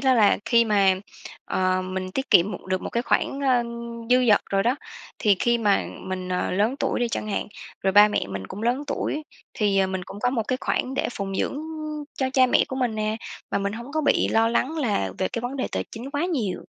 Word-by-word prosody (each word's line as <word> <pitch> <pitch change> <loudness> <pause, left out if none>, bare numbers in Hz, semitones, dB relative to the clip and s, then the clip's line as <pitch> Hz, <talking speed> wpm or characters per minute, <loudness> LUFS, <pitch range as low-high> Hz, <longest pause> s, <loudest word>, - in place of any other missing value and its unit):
đó 265 -2 +4
là 215 -3 +5
khi 235 -1 +4
mà, 200 -3 +4 0.5
ờ, 185 0 +1
mình 185 0 -4
tiết 265 +6 -3
kiệm 180 +4 +6
một 185 - -7
được 185 0 -1
một - - -4
cái 235 - 0
khoản, 275 +2 0
ơ, 255 -3 +3 0.5
dư 250 0 +5
dật 205 - +6
rồi 195 0 +2
đó, 245 +3 +2 0.4
thì 205 -4 +3
khi 235 0 +3
mà 205 -3 +2 0.2
mình, 185 -1 -5
ờ, 180 0 -1
lớn 210 +7 +1
tuổi - - 0
đi 240 - +1
chẳng 215 - -3
hạn, - - -1 0.4
rồi 190 0 +2
ba 205 +1 +8
mẹ 210 - -1
mình 95 -1 -5
cũng 210 - -7
lớn 245 +5 +1
tuổi, 305 +1 -2 0.3
thì, 205 -5 +2
ờ, 190 - +4
mình 190 -1 -3
cũng 200 +2 -9
có 245 - +2
một 235 -4 0
cái 255 - +1
khoản 260 +1 -1
để - - 0
phụng 195 -1 -3
dưỡng, - - -1
ưm, 310 0 -5
cho 260 -1 -1
cha 255 -1 +5
mẹ - - +4
của 260 - -4
mình 245 -4 0
nè, 215 0 -1 0.3
mà - - +1
mình 200 0 -2
hông 235 +5 -8
có 315 - +1
bị 285 - +2
lo 225 0 +3
lắng 275 +7 0
là 205 - 0
về 185 - 0
cái 235 - -4
vấn 255 +3 -3
đề 260 - -1
tài - - -1
chính 240 +5 -7
quá 290 +3 -1
nhiều. 250 - -2
225 Hz, 245 wpm, -24 LUFS, 195-260 Hz, 0.5 s, ba